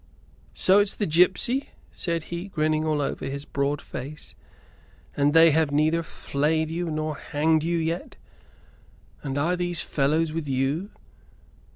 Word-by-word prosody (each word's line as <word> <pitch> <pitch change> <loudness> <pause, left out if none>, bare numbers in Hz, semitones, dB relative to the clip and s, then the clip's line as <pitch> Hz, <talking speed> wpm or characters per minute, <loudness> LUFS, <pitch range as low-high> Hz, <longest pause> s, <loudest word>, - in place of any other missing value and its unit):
"So 190 +2 +5
it's 205 0 +1
the 205 - -1
gipsy?" 185 - +2 0.2
said 170 -2 -3
he, 170 +3 -4
grinning 155 -3 0
all 150 -2 +1
over - - -3
his 140 +1 -5
broad 140 +1 -1
face. 145 +4 -8 0.8
"And 145 0 +3
they 165 +1 +7
have 155 -1 +2
neither 155 +3 +2
flayed 155 0 -1
you 170 +1 -2
nor 155 -1 -2
hanged 155 +2 +1
you 170 +2 0
yet? 165 +1 -3 1.1
And 135 -1 -4
are 165 +5 +1
these 175 -1 -1
fellows 155 +3 0
with 160 -2 -3
you?" 135 +8 -1
155 Hz, 145 wpm, -25 LUFS, 145-170 Hz, 1.1 s, they